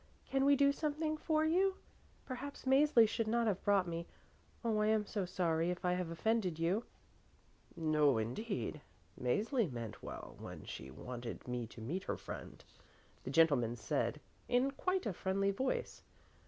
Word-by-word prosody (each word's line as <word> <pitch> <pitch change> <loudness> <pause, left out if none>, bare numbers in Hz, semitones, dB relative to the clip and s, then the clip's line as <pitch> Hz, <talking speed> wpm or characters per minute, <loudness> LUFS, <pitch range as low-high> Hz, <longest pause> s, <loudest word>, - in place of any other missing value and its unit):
Can 270 0 +1
we 285 0 +6
do 280 0 +5
something 305 +1 -1
for 310 0 +1
you? 375 +4 +3 0.5
Perhaps 270 +2 -6
Mäzli 265 -3 +6
should 225 +1 -1
not 235 +1 +2
have 200 -4 0
brought 200 -3 +3
me. 170 0 -4 0.6
Oh, 220 -2 +2
I 210 - +3
am 215 -1 +3
so 200 -2 -2
sorry 170 -2 +1
if 180 0 -3
I 180 - +3
have 180 -2 -2
offended 185 0 0
you." 180 +8 +1 0.9
"No, 150 -5 +3
indeed. 150 - -3 0.4
Mäzli 205 - +1
meant 115 -3 -6
well - - -8
when - - -8
she 65 - -7
wanted 120 - -7
me 125 -2 -2
to 115 - -11
meet 175 +12 -3
her - - -2
friend," - - -8 0.6
the - - -3
gentleman 140 -6 +4
said 115 - -1 0.3
in 250 +2 +3
quite 370 +5 -1
a 210 - -1
friendly 195 +2 +1
voice. 260 +7 -2
195 Hz, 160 wpm, -36 LUFS, 160-260 Hz, 0.9 s, we